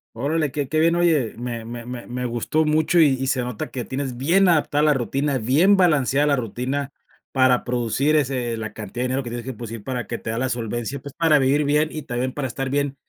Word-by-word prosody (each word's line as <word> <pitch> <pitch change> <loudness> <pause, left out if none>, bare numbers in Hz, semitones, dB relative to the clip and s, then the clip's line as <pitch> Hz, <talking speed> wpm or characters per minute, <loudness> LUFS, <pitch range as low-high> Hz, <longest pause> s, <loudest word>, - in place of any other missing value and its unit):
Órale, 145 +3 0
qué 145 -3 -3
qué 155 - +1
bien, 165 +1 +3
oye, 160 -9 +2
me 120 -2 -5
me 120 +1 -7
me 125 -1 -6
me 125 +1 -4
gustó 120 +7 0
mucho, 155 +3 +2
y 145 -5 +5
y 135 - -1
se 130 -1 0
nota 125 -3 -5
que 125 - -4
tienes 130 -1 -4
bien 175 +10 +3
adaptada 150 -3 +2
la 150 -1 +5
rutina, 135 +2 -1
bien 150 - +4
balanceada 150 -6 +3
la 145 - +3
rutina 130 +4 -3 0.4
para 130 -2 +3
producir 125 +5 0
ese 125 -5 0
la 110 -1 -5
cantidad 110 +3 -6
de - - 0
dinero 130 +1 -1
que 120 - -7
tienes 120 -1 -5
que 130 +1 -5
producir, 115 -1 -8
para 125 -1 -3
que 115 - -5
te - - -6
da 115 - -2
la 130 +1 0
solvencia, 120 +2 -3
pues 140 +1 -11
para 160 -3 +4
vivir 140 +3 +2
bien 150 +2 +2
y 155 - -6
también 125 0 -2
para 140 -1 -3
estar 135 +2 -4
bien 140 0 -1
130 Hz, 235 wpm, -22 LUFS, 120-150 Hz, 0.4 s, y